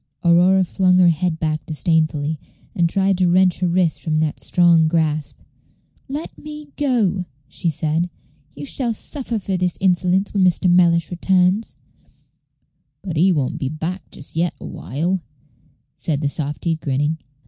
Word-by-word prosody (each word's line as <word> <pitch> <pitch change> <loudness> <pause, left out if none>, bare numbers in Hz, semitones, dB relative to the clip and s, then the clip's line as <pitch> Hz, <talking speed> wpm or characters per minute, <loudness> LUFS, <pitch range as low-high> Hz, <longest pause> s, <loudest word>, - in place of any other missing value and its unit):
Aurora 180 +3 +5
flung 185 0 +2
her 180 -1 +6
head 165 0 0
back 155 -2 -2
disdainfully, 155 -2 0 0.3
and 170 -1 +1
tried 195 +1 +1
to 180 -1 +3
wrench 185 0 +3
her 180 - +1
wrist 175 -1 +1
from 155 -1 -1
that 155 -1 -1
strong 170 -3 +3
grasp. 155 -2 -1 0.7
"Let 290 +3 -5
me 300 -1 -9
go," 225 -10 +1 0.2
she 170 - -2
said. 160 +3 0 0.5
"You 145 - -7
shall 235 - 0
suffer 240 0 -2
for 195 -2 -2
this 180 -1 0
insolence 185 +1 +1
when 200 -2 +2
Mr. 180 +1 +2
Mellish 175 -1 +4
returns." 185 +4 +1 1.3
"But 180 -5 -4
he 180 +5 +4
won't 145 -7 -1
be 135 - -2
back 165 +5 -5
just 145 - -6
yet 170 +1 0
a - - -9
while," 170 +7 -3 0.8
said 150 -3 -2
the 145 - 0
softy, 150 +3 -2
grinning. 145 +1 -1
175 Hz, 150 wpm, -20 LUFS, 155-190 Hz, 1.3 s, her